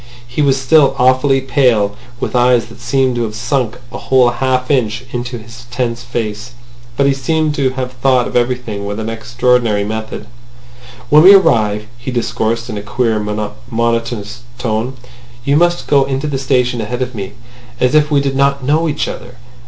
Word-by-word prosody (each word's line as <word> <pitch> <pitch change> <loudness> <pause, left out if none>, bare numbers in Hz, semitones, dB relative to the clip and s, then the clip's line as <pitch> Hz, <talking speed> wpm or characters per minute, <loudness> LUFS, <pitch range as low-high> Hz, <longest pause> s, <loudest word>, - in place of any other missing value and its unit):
He 125 +5 -2
was 135 -2 +2
still 135 +1 +4
awfully 130 +2 +3
pale, 125 -7 +2 0.2
with - - -3
eyes 125 -1 +3
that 115 +1 -14
seemed 130 +1 +1
to - - 0
have 110 -2 -3
sunk 125 0 -1
a 120 - -6
whole 130 -2 +3
half 130 +2 -1
inch 120 -3 0
into 120 0 -4
his 115 +2 -13
tense 120 -1 -2
face. 115 0 -5 0.4
But 140 - +3
he 140 - +3
seemed 155 +3 0
to 140 -3 +1
have 130 -1 -4
thought 125 -1 +1
of - - -8
everything 120 -4 -1
with 100 +1 -4
extraordinary 115 -1 +1
method. 110 0 -5 0.9
"When 150 +1 +8
we 190 +4 +9
arrive," 110 - +2
he 120 - -6
discoursed 115 -1 -1
in 110 -4 -4
a - - -6
queer, 115 0 0
monotonous 115 +1 -3 0.2
tone, 120 +1 -2 0.5
"you 140 - +2
must 175 +2 +2
go 140 -2 +3
into 135 +1 -2
the 140 -3 -2
station 125 -3 0
ahead 125 +4 -2
of 125 0 -6
me, 100 -4 -6 0.5
as 125 +2 +2
if 150 -1 +4
we 145 -2 +2
did 135 -1 -2
not 140 0 +1
know 155 +5 +1
each 150 - -2
other. 125 +1 -8
125 Hz, 175 wpm, -15 LUFS, 115-135 Hz, 0.9 s, we